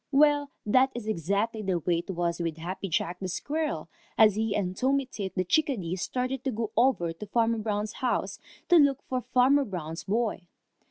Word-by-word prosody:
Well, 290 Hz, 0 st, +4 dB, 0.2 s
that 255 Hz, +5 st, +4 dB
is 240 Hz, -3 st, -5 dB
exactly 215 Hz, +3 st, -1 dB
the 190 Hz, -3 st, 0 dB
way 170 Hz, +1 st, 0 dB
it 175 Hz, -, -9 dB
was 175 Hz, -2 st, -1 dB
with 165 Hz, -2 st, -2 dB
Happy 185 Hz, +4 st, -5 dB
Jack 175 Hz, +2 st, -1 dB
Squirrel, 305 Hz, -, -2 dB, 0.3 s
as 215 Hz, -2 st, +7 dB
he 215 Hz, 0 st, -1 dB
and 185 Hz, -3 st, -1 dB
Tommy 270 Hz, +5 st, +1 dB
Tit 200 Hz, -6 st, -6 dB
the 185 Hz, -, +1 dB
Chickadee 190 Hz, -, 0 dB
started 255 Hz, +6 st, -3 dB
to 265 Hz, -, -1 dB
go 220 Hz, -1 st, -3 dB
over 230 Hz, -9 st, +2 dB
to 190 Hz, +6 st, -8 dB
Farmer 230 Hz, +1 st, +1 dB
Brown's 210 Hz, 0 st, -2 dB
house 255 Hz, -2 st, -2 dB, 0.3 s
to 350 Hz, -, +7 dB
look 280 Hz, -3 st, +4 dB
for 255 Hz, -1 st, -2 dB
Farmer 255 Hz, +3 st, +3 dB
Brown's 170 Hz, -, -6 dB
boy. 215 Hz, -3 st, -1 dB
215 Hz, 180 wpm, -28 LUFS, 185-260 Hz, 0.3 s, as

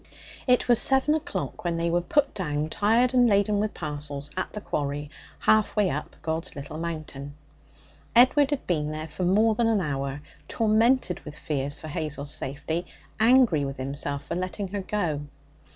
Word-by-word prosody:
It 250 Hz, -1 st, +3 dB
was 240 Hz, -2 st, +6 dB
seven 270 Hz, +3 st, +5 dB
o'clock 315 Hz, +2 st, -4 dB
when 170 Hz, -1 st, -1 dB
they 170 Hz, 0 st, 0 dB
were 175 Hz, +1 st, +2 dB
put 280 Hz, +10 st, +1 dB
down, 150 Hz, -5 st, -2 dB
tired 230 Hz, +8 st, +2 dB
and 245 Hz, -2 st, +5 dB
laden 205 Hz, 0 st, +2 dB
with 210 Hz, 0 st, -2 dB
parcels, 145 Hz, -2 st, -4 dB
at 185 Hz, -, -3 dB
the 210 Hz, -, -6 dB
quarry 145 Hz, -5 st, -3 dB, 0.3 s
half 215 Hz, -1 st, +2 dB
way 205 Hz, -4 st, +2 dB
up 150 Hz, -, -5 dB
God's 165 Hz, +2 st, -2 dB
Little 145 Hz, +2 st, -7 dB
Mountain. 155 Hz, -4 st, -6 dB, 0.8 s
Edward 265 Hz, +4 st, +6 dB
had 290 Hz, -2 st, -2 dB
been 150 Hz, -4 st, 0 dB
there 155 Hz, +1 st, -5 dB
for 160 Hz, +4 st, -5 dB
more 215 Hz, +5 st, +4 dB
than 230 Hz, +1 st, +1 dB
an 225 Hz, -2 st, +2 dB
hour, 140 Hz, -3 st, -3 dB, 0.2 s
tormented 225 Hz, -2 st, +2 dB
with 150 Hz, -1 st, -10 dB
fears 145 Hz, -1 st, -2 dB
for 155 Hz, -, -8 dB
Hazel's 150 Hz, -1 st, -4 dB
safety, 150 Hz, +6 st, -3 dB, 0.3 s
angry 230 Hz, -, +5 dB
with 135 Hz, 0 st, -4 dB
himself 140 Hz, +2 st, -2 dB
for -, -, -4 dB
letting 185 Hz, +2 st, -3 dB
her 200 Hz, +1 st, -3 dB
go. 175 Hz, -7 st, -2 dB
170 Hz, 170 wpm, -26 LUFS, 145-215 Hz, 0.8 s, was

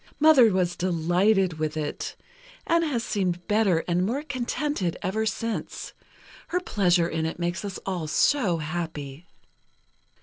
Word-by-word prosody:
Mother 290 Hz, -7 st, +7 dB
was 180 Hz, -2 st, +1 dB
delighted 180 Hz, +1 st, +1 dB
with 155 Hz, 0 st, -2 dB
it, 150 Hz, -1 st, -4 dB, 0.5 s
and 335 Hz, 0 st, +3 dB
has 265 Hz, -8 st, -1 dB
seemed 180 Hz, -5 st, -2 dB
better 205 Hz, -6 st, +2 dB
and 175 Hz, +1 st, +1 dB
more 250 Hz, +9 st, -1 dB
contented 255 Hz, -, -2 dB
ever 220 Hz, +4 st, 0 dB
since. 225 Hz, +2 st, -4 dB, 0.5 s
Her 360 Hz, -, 0 dB
pleasure 180 Hz, -, +2 dB
in 160 Hz, -1 st, -1 dB
it 160 Hz, -, -5 dB
makes 175 Hz, +3 st, -2 dB
us 200 Hz, -3 st, -5 dB
all 180 Hz, -5 st, -2 dB
so 185 Hz, -, +2 dB
happy." 155 Hz, -1 st, -5 dB
185 Hz, 135 wpm, -26 LUFS, 170-225 Hz, 0.5 s, Mother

